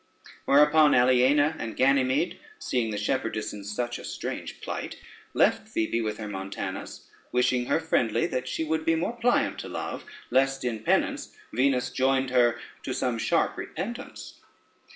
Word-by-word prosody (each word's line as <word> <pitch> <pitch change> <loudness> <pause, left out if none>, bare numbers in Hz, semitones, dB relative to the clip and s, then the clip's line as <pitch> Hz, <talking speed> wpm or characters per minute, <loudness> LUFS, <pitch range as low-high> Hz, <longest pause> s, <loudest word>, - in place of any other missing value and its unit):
Whereupon 150 +1 +5
Aliena 130 +5 +4
and 115 -1 -5
Ganymede, 135 +6 +2 0.2
seeing 125 - -1
the 105 - -3
shepherdess 110 0 -2
in 105 -1 -8
such 120 +4 -3
a - - -10
strange - - -5
plight, - - -5 0.4
left - - +2
Phoebe 115 +1 0
with 110 -1 -2
her 110 - -6
Montanus, 95 -1 -6 0.2
wishing 125 0 +1
her - - +2
friendly 120 -8 +1
that 130 0 -3
she 160 - -2
would 160 0 -1
be 165 +1 +2
more 175 +9 -2
pliant 245 +1 +1
to - - -6
Love, - - -5 0.3
lest 135 +1 +2
in 115 -3 -1
penance 110 - 0 0.2
Venus 125 0 +1
joined 130 0 +1
her 120 -2 +3 0.2
to 130 - -4
some 120 -3 -1
sharp 110 -1 +1
repentance. 240 +7 -7
130 Hz, 150 wpm, -27 LUFS, 115-145 Hz, 0.4 s, Whereupon